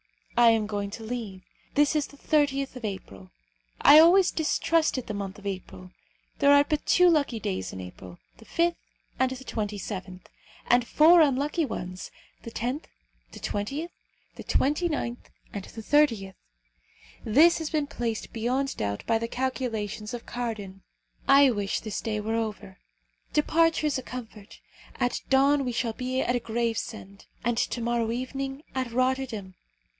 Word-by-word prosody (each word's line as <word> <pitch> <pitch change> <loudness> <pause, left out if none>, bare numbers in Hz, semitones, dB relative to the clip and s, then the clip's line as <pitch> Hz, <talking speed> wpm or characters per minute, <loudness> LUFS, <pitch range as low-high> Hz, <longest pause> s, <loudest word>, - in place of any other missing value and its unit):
I 240 -1 +7
am 225 -2 +3
going 205 -1 -3
to 225 - -8
leave. 220 -5 -5 0.3
This 295 +1 +3
is 300 -2 +1
the 285 - -17
30th 275 -3 +1
of 250 - -9
April. 100 - -7 0.5
I 300 - +9
always 355 +3 +6
distrusted 315 -3 +1
the 215 - -5
month 200 -1 -5
of 205 - -14
April. 135 - -6 0.5
There 280 - +5
are 285 0 +7
but 300 0 -2
two 360 0 +5
lucky 285 -8 +2
days 95 - -3
in 95 - -8
April, 90 0 -10 0.2
the - - -16
5th 340 +1 +1 0.5
and 260 - +3
the 260 0 -7
27th; 200 -4 -5 0.4
and 245 -1 +3
four 330 +3 +6
unlucky 295 +3 +2
ones 185 -9 -5 0.3
the - - -8
10th, 250 +6 -3 0.5
the - - -9
20th, 280 +12 -3 0.5
the - - -7
29th, 290 -5 -1 0.2
and 200 -2 -5
the 225 - -10
30th. 230 -9 +2 0.9
This 320 +11 +5
has 320 -2 -3
been 305 -2 0
placed 235 -5 -4
beyond 255 +4 -1
doubt 100 -1 -3
by 225 -1 +2
the 230 - -3
calculations 230 -4 -3
of 235 - -9
Cardan. 215 -6 -5 0.5
I 275 -1 +7
wish 205 -3 -1
this 215 -3 -4
day 215 -2 -2
were 215 +2 -2
over. 215 -3 -4 0.5
Departure 325 +1 +2
is 290 -3 +1
a - - -8
comfort. 225 -5 -9 0.4
At 245 -1 0
dawn 275 +1 +4
we 250 - -2
shall 230 -1 -1
be 255 +2 -2
at 245 0 0
Gravesend, 225 -3 -4 0.2
and 235 0 0
to 240 - -1
morrow 235 -1 0
evening 270 +3 -4
at 255 -2 -2
Rotterdam. 255 -6 -1
240 Hz, 155 wpm, -27 LUFS, 210-280 Hz, 0.9 s, I